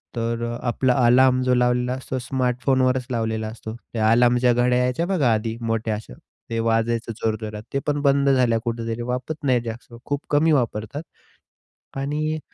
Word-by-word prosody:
तर 115 0 -2
अ, 120 0 -4
आपला 125 +2 +2
अलार्म 130 +1 +5
जो 125 0 +2
लावलेला 125 0 +1
असतो, 130 0 -4
स्मार्टफोनवरच 130 0 0
लावलेला 110 -2 -1
असतो. 110 0 -7 0.2
त्या 110 -1 +2
अलार्मच्या 120 +1 +4
घड्या 125 +1 +2
यायच्या 125 +6 0
बघा 160 -11 +2
आधी 110 +1 -2
मोठ्या 115 -1 -1
अशा, 105 - -9 0.4
ते 115 - -2
वाजायचं 115 +1 0
जोरजोरात. 110 -1 -3
ते 140 - +1
पण 145 0 +1
बंद 140 0 +3
झाल्या 125 -4 +3
कुठेतरी, 115 -1 -3
वापरत 125 +6 -4
नाही 125 -3 +3
जास्त 115 +1 -7
खूप 145 0 -2
कमी 150 +2 +3
वापरतात. 120 -1 -1 1.0
आणि 150 +3 -2
125 Hz, 160 wpm, -23 LUFS, 115-130 Hz, 1.0 s, अलार्म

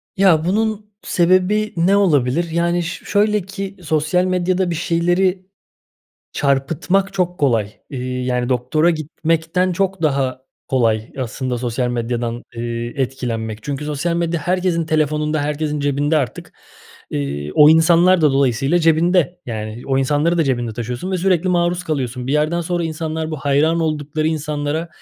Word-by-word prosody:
Ya, 175 -5 +4
bunun 210 +2 -1
sebebi 185 +4 +2
ne 190 +4 +3
olabilir? 165 -3 +2
Yani, 170 +1 +1
ş 180 - -6
şöyle 210 0 +2
ki 195 +1 -7
sosyal 155 +3 +1
medyada 185 0 0
bir 170 - -2
şeyleri 175 +3 0 0.9
çarpıtmak 160 +8 0
çok 180 -2 -1
kolay. 115 -7 +1 0.2
Eee, 125 -1 -4
yani, 125 -1 -1
doktora 130 +7 +2
gitmekten 165 +3 -1
çok 190 -1 -1
daha 135 -3 0 0.3
kolay 115 -3 +1
aslında 125 0 -3
sosyal 125 0 -1
medyadan, 120 0 -2
ııı, 120 0 -4
etkilenmek. 115 -5 -3
Çünkü 145 +2 -4
sosyal 150 +3 -1
medya 170 -1 -1
herkesin 175 -1 0
telefonunda, 150 -1 0
herkesin 150 0 -2
cebinde 145 +2 +1
artık. 130 -7 -3 0.6
Iıı, 70 +1 -3
o 150 0 +7
insanlar 170 +2 +5
da 150 -3 +4
dolayısıyla 135 +4 +2
cebinde. 170 +1 +2
Yani, 110 0 -5
o 135 -1 +1
insanları 150 +5 +1
da 160 - +3
cebinde 120 -4 -1
taşıyorsun 120 - -4
ve 185 - 0
sürekli 185 0 +1
maruz 175 0 +1
kalıyorsun. 125 -5 -3
Bir 135 - -1
yerden 155 +3 +1
sonra 175 0 -2
insanlar 160 0 -3
bu 155 - -3
hayran 145 +4 +1
oldukları 155 0 -1
insanlara, 155 +1 -2
155 Hz, 145 wpm, -19 LUFS, 130-175 Hz, 0.9 s, o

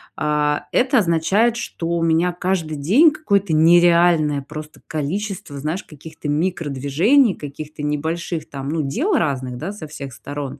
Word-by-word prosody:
а, 150 -1 0
это 260 +1 +2
означает, 195 +6 +2
что 170 -7 -5
у 170 0 0
меня, 165 +2 +2
каждый 175 -3 -2
день 225 - +5
какое-то 200 - 0
нереальное 170 -2 +4
просто 155 +2 -10
количество, 160 0 -4
знаешь, 155 +7 -3
каких-то 155 0 -9
микродвижений, 165 - +2
каких-то 150 +1 -8
небольших 160 +2 -3
там, 135 -1 -6
ну, 160 +1 -1
дел 255 - -1
разных, 130 - -1
да, 160 +10 -4
со 205 -6 -8
всех 140 -3 -8
сторон 140 +2 -7
160 Hz, 140 wpm, -20 LUFS, 145-185 Hz, -, день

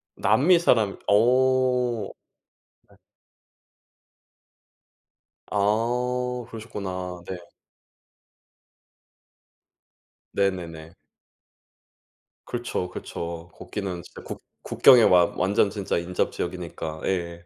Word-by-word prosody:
남미 145 - +4
사람. 110 - +2
어. 125 0 +3 0.8
네. - - -22 2.5
아. 125 +4 0
그러셨구나. 95 -5 -6
네. 95 - -4 3.0
네네네. 85 -5 -2 1.5
그렇죠, 120 -7 -3
그렇죠. 85 -1 -6
거기는 95 -4 -5
진짜 - - -13
국 - - -8 0.2
국경에 125 -4 +6
와 90 -3 +6
완전 100 +1 +2
진짜 100 -1 -2
인접지역이니까. 85 -2 -3
예. 85 -2 -3
100 Hz, 150 characters per minute, -25 LUFS, 90-120 Hz, 3.0 s, 국경에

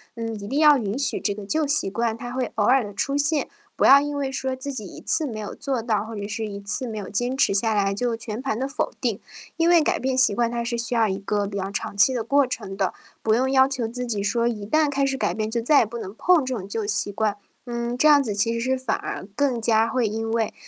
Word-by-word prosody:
嗯， 225 -1 -4
一 200 - -7
定 270 +6 -2
要 300 -2 +7
允 215 -1 -2
许 275 - -1
这 205 - -1
个 205 -1 -8
旧 310 +6 0
习 285 -9 +1
惯， 230 +2 -1
它 245 +1 -7
会 255 -1 -3
偶 210 - +1
尔 250 0 +4
地 205 - -8
出 275 +8 -1
现， 295 +1 +1 0.3
不 - - -1
要 280 - +9
因 290 0 -3
为 275 -2 -2
说 265 0 -2
自 280 +2 -6
己， 215 -6 -6
一 - - -10
次 315 -3 0
没 220 -3 -6
有 210 -1 -5
做 270 -5 -2
到， 215 -2 0
或 225 0 -7
者 200 - -4
是 220 +2 -3
一 200 -1 -6
次 220 +5 -3
没 220 - -5
有 205 - -6
坚 245 +5 -1
持 230 - +3
下 220 +2 +2
来 200 -1 +1
就 235 +2 -1
全 225 +1 -6
盘 265 -5 -2
的 265 - -1
否 275 +2 -2
定。 230 -6 -1 0.4
因 330 0 +2
为 345 -2 +6
改 - - 0
变 260 0 -1
习 260 -6 +4
惯， 235 +1 +1
它 235 0 -2
是 235 0 -2
需 235 +1 -3
要 225 -2 +3
一 190 - -2
个 205 +1 -1
比 200 0 -5
较 195 0 -3
长 200 0 -4
期 205 +6 +5
的 235 -3 -1
过 275 +3 +3
程 200 -6 -5
的， 190 -2 0 0.3
不 220 0 +2
用 260 +2 +1
要 265 0 +5
求 260 -4 -2
自 250 +2 -4
己 210 -4 -2
说 235 +3 +1
一 210 -4 -3
旦 305 +6 +2
开 275 0 +1
始 270 0 -1
改 - - 0
变 215 0 -3
就 235 0 -1
再 285 +5 +5
也 - - +3
不 235 +3 -7
能 200 -2 -7
碰 345 -3 +3
这 255 -1 -2
种 190 - -6
旧 210 +1 -3
习 205 0 -1
惯。 215 0 0 0.3
嗯， 235 0 -3
这 305 - +4
样 290 -2 +7
子 215 -6 -3
其 230 +3 +1
实 230 - -2
是 260 +2 0
反 255 -4 -1
而 - - -5
更 265 -5 +1
加 225 0 +3
会 250 -2 0
因 225 +1 -3
为 225 -1 0
235 Hz, 310 characters per minute, -24 LUFS, 210-265 Hz, 0.4 s, 要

